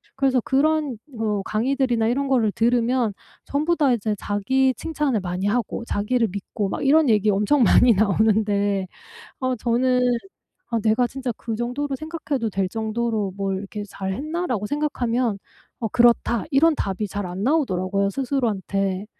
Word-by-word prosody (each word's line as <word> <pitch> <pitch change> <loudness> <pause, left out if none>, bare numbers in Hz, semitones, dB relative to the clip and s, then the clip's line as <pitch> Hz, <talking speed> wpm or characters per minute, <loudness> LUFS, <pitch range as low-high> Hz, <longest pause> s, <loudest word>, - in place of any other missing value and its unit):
그래서 270 -1 +2
그런 295 0 +1 0.2
뭐 215 -4 -2
강의들이나 240 +1 0
이런 275 +4 0
거를 240 -6 +2
들으면 235 0 +1 0.3
전부 310 +5 0
다 290 -5 +3
이제 215 -2 -1
자기 260 +6 +1
칭찬을 295 -8 -1
많이 180 +1 -2
하고 230 +1 -1
자기를 230 +3 0
믿고 200 +1 -4
막 275 - -3
이런 300 0 +5
얘기 215 -1 +3
엄청 210 +8 +3
많이 240 +1 +6
나오는데 205 -1 +2 0.5
어 255 -1 0
저는 250 +2 +1 0.8
'내가 225 +3 +3
진짜 260 0 -4
그 230 - -5
정도로 260 +4 -2
생각해도 305 -5 -3
될 190 -1 -1
정도로 220 -2 -2
뭘 195 -1 -2
이렇게 205 +2 -6
잘 190 -1 -4
했나?' 315 - -3
라고 215 - -2
생각하면 250 -6 -1 0.4
"어. 225 - -1
그렇다." 235 -2 +3
이런 310 +3 +4
답이 200 -3 -2
잘 205 -1 -4
안 180 +2 -5
나오더라고요 200 - +1
스스로한테. 200 -6 -1
230 Hz, 320 characters per minute, -23 LUFS, 205-265 Hz, 0.8 s, 많이